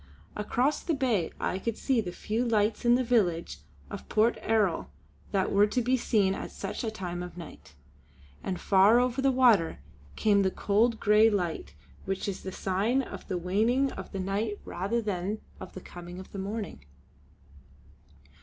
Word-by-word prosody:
Across 250 +7 0
the 330 - +1
Bay 235 - 0
I 185 - -1
could 225 +2 -3
see 260 -4 +1
the 180 -4 -5
few 220 +6 -2
lights 220 -1 +1
in 240 0 +6
the 255 - +1
village 195 -9 +1 0.3
of 200 - -8
Port 220 +2 +3
Erroll 210 -6 +1 0.4
that 195 -2 +1
were 205 +1 +5
to 250 - -1
be 250 +2 +2
seen 205 -6 +2
at - - -5
such 200 +4 -5
a 225 - -1
time 180 -4 -5
of 180 0 -8
night; 155 - -11 0.7
and 185 -2 -3
far 200 +4 +5
over 250 +1 0
the 270 0 +3
water 235 -10 +4 0.4
came 205 -2 +3
the 190 - +2
cold 220 +4 +1
grey 210 +2 +5
light 170 - -2 0.3
which 190 +1 -2
is 195 -2 -4
the 190 - -6
sign 200 +9 0
of - - -9
the 185 - -2
waning 225 +10 +1
of - - -8
the 195 - -4
night 205 +3 -2
rather 225 +6 -2
than 200 0 -2 0.2
of - - -9
the 185 - -8
coming 175 0 -10
of 185 - -10
the 200 - -6
morning. 200 - -5
205 Hz, 175 wpm, -28 LUFS, 190-235 Hz, 0.7 s, in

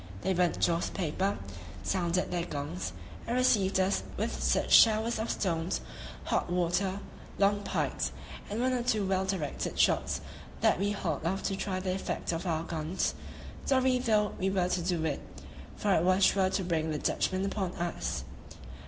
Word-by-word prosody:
They 190 - +1
burnt 180 -1 +2
joss 170 0 +2
paper; 190 +3 -1 0.5
sounded 180 -1 0
their 175 -1 0
gongs, 95 - -4 0.4
and 235 - 0
received 200 -7 +3
us 190 +1 +2 0.2
with - - -2
such - - +1
showers 220 +1 +6
of 220 - -2
stones, 170 -2 -1 0.4
hot - - 0
water, 180 +3 0 0.4
long 205 +1 +3
pikes, 200 - -1 0.4
and 210 +2 -3
one 255 +1 +2
or 250 - 0
two 220 -4 +1
well 190 0 +1
directed 185 -7 -3
shots - - +2 0.4
that - - +4
we 200 +1 +1
hauled 170 -8 -2
off 195 +3 -1
to 195 - 0
try 190 -1 -2
the 185 0 -1
effect 190 - -3
of 170 +2 -3
our 160 -1 0
guns, 165 +2 -1 0.5
sorry 260 -1 +3
though 215 -4 +2
we 190 - +1
were 185 -2 +1
to 180 - 0
do 170 -2 0
it, 150 -3 -1 0.5
for 205 -2 +1
it 160 - +4
was 185 +2 +3
sure 190 -1 +4
to 190 0 -1
bring 160 -3 0
the 155 - -1
Dutchmen 185 +5 0
upon 195 -2 -2
us. 175 0 -3
190 Hz, 170 wpm, -30 LUFS, 170-200 Hz, 0.5 s, showers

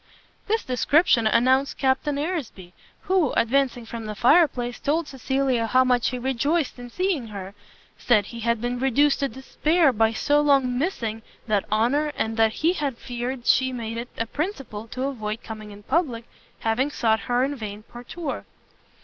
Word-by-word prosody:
This 440 +2 +1
description 255 -1 +3
announced 260 +5 +3
Captain 270 +2 +1
Aresby; 285 - -4 0.3
who, 370 -7 +1
advancing 245 0 +1
from 225 -1 -7
the 210 - -5
fire 310 - +5
place, 245 -3 -5
told 310 +2 0
Cecilia 265 -3 0
how 255 +3 +4
much 250 -2 +2
he 255 - -4
rejoiced 265 +4 -1
in 245 0 -8
seeing 360 -5 -1
her, 200 -2 -8 0.5
said 215 -5 +3
he 235 +3 -9
had 235 0 0
been 245 +1 -2
reduced 270 +2 +3
to 275 - +1
despair 300 +3 +1
by 225 0 +3
so 290 +6 +2
long 275 -4 +3
missing 230 - -2 0.2
that 210 -3 0
honour, 275 +8 +1
and 225 0 -2
that 225 -1 +3
he 340 - +5
had 285 -8 -3
feared 245 0 -5
she 260 0 +3
made 230 -2 -5
it 240 +1 -6
a 230 - -1
principle 270 - -5
to 255 +3 -5
avoid 225 -5 -3
coming 215 -2 -8
in 205 0 -12
public, 260 - -1 0.4
having 225 +5 +1
sought 225 -6 +1
her 245 +4 0
in 280 +2 -1
vain 210 -4 -7
partout. 245 +8 -6
250 Hz, 170 wpm, -24 LUFS, 225-285 Hz, 0.5 s, fire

